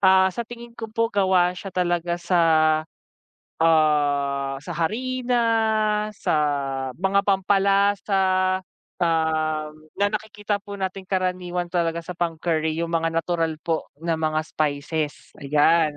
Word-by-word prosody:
Ah, 190 -1 +5
sa 235 +4 -5
tingin 235 0 -10
ko 230 -1 -7
po 230 +1 0
gawa 185 -3 +3
siya 195 +2 -8
talaga 175 -1 0
sa, 175 0 +1 1.2
ah, 145 -4 +2
sa - - -7
harina, 245 +7 0 0.7
sa 200 - -1 0.7
mga 195 +1 +3
pampalasa, 195 -1 +2 0.4
um, 155 -2 0 0.3
na 205 - +3
nakikita 210 -1 -3
po 200 0 -8
nating 190 0 -4
karaniwan 180 -2 -1
talaga 170 -1 0
sa 180 - -5
pang-curry 160 -2 -1
yung 170 0 -2
mga 165 0 +1
natural 165 -1 -1
po 165 -1 -1
na 165 0 -1
mga 155 0 +1
spices, 150 0 -3
ayan. 150 +2 +3
175 Hz, 120 wpm, -23 LUFS, 160-195 Hz, 1.2 s, Ah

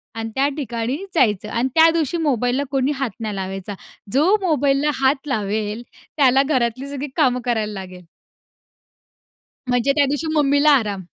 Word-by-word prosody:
आणि 225 0 -4
त्या 275 +1 +2
ठिकाणी 240 -2 -3 0.2
जायचं 210 - +2
आणि 235 +4 0
त्या 325 0 +7
दिवशी 330 0 0
मोबाईलला 265 -3 0
कोणी 270 +1 +1
हात 265 -3 -2
नाही 215 -2 -4
लावायचा. 195 +1 -5 0.4
जो 320 +10 +4
मोबाईलला 290 -3 +1
हात 270 +2 +1
लावेल 215 -1 -2 0.3
त्याला 270 -1 +4
घरातली 255 -2 -1
सगळी 285 +1 -5
कामं 255 -6 +2
करायला 220 -3 -1
लागेल. 185 -2 -9 1.6
म्हणजे 245 +2 +2
त्यादिवशी 290 +2 +1
मम्मीला 285 +1 +4
आराम. 205 -5 -3
260 Hz, 140 wpm, -20 LUFS, 220-285 Hz, 1.6 s, त्या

